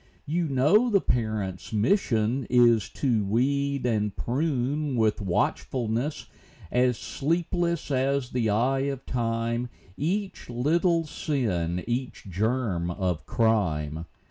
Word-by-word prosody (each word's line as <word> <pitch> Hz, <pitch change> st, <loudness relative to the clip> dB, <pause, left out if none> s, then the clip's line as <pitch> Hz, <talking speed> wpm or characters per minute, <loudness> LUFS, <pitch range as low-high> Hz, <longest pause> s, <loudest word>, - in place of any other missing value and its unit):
You 165 Hz, +3 st, 0 dB
know 150 Hz, -, +4 dB
the 200 Hz, -3 st, +4 dB
parents' 110 Hz, -, -2 dB
mission 115 Hz, -, +1 dB
is 120 Hz, -3 st, +4 dB
To 120 Hz, -7 st, 0 dB
weed 140 Hz, +6 st, 0 dB
and 105 Hz, -4 st, 0 dB
prune, 140 Hz, +1 st, -1 dB
with 110 Hz, -2 st, +1 dB
watchfulness 115 Hz, -, -1 dB, 0.5 s
As 125 Hz, -1 st, +2 dB
sleepless 170 Hz, +1 st, -1 dB
as 135 Hz, -1 st, 0 dB
the 120 Hz, -3 st, 0 dB
eye 125 Hz, +6 st, +2 dB
of 135 Hz, -1 st, -5 dB
time, 115 Hz, 0 st, -1 dB, 0.3 s
Each 190 Hz, +5 st, -2 dB
little 165 Hz, +7 st, +2 dB
sin, 90 Hz, -, -1 dB
each 125 Hz, +2 st, -3 dB
germ 100 Hz, -2 st, -1 dB
of 90 Hz, -3 st, -2 dB
crime. 85 Hz, -, 0 dB
125 Hz, 110 wpm, -26 LUFS, 110-140 Hz, 0.5 s, know